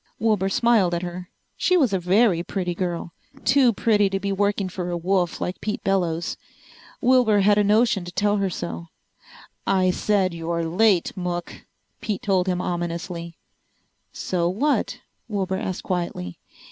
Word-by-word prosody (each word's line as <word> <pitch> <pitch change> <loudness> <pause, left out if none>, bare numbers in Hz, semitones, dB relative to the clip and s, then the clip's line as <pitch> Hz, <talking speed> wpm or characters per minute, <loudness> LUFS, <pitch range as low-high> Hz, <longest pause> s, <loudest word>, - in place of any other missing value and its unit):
Wilbur 210 -4 +1
smiled 205 -5 +3
at 170 - -3
her. 180 0 -6 0.3
She 365 - +2
was 265 - +2
a 190 - +2
very 185 0 +3
pretty 180 0 -3
girl. 175 -1 -3 0.3
Too 255 -1 +5
pretty 210 -2 +2
to 195 0 -2
be 200 0 -2
working 200 0 0
for 180 -1 -5
a 175 - -2
wolf 175 0 0
like 180 - -4
Pete 210 0 -3
Bellows. 175 -4 0 0.6
Wilbur 245 -5 +4
had 205 +1 +4
a - - +4
notion 210 -1 +3
to 175 - -7
tell 205 +2 +1
her 195 -1 0
so. 85 - -5 0.8
"I 185 -1 +3
said 190 -1 +1
you're 170 0 -2
late, 185 +2 +2
Mook," 175 -2 -5 0.3
Pete 210 -3 -3
told 190 -2 +1
him 180 -1 0
ominously. 170 -1 -4 0.7
"So 175 -2 -1
what?" 275 +11 0 0.3
Wilbur 190 -3 -1
asked 185 -1 -4
quietly. 170 - -3
190 Hz, 155 wpm, -23 LUFS, 175-205 Hz, 0.8 s, Too